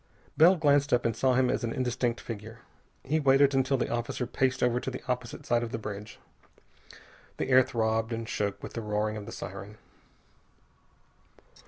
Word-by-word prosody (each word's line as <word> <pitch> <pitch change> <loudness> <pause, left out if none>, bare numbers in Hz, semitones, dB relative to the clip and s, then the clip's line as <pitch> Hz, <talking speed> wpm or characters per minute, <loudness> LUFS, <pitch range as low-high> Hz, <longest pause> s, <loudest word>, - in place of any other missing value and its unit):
Bell 175 +4 +7
glanced 145 -3 +3
up 120 - +2
and 115 -2 +1
saw 130 +1 +2
him 130 0 +3
as 130 - -2
an 115 - -1
indistinct 125 -1 -1
figure. 115 +1 -8 0.4
He 155 +4 0
waited 140 -1 +4
until 135 0 +2
the - - -2
officer 120 +1 -2
paced 130 +2 0
over 125 0 +2
to 130 - -4
the 130 - -7
opposite 125 -1 -4
side 120 0 +2
of 120 -1 -4
the - - -2
bridge. 105 -1 -7 1.2
The - - -2
air 130 0 +7
throbbed 115 -1 0
and 115 0 -4
shook 100 -2 -2
with - - -7
the 115 - -4
roaring 105 0 -1
of 105 -1 -7
the - - -7
siren. 100 +3 -8
120 Hz, 180 wpm, -29 LUFS, 110-130 Hz, 1.2 s, Bell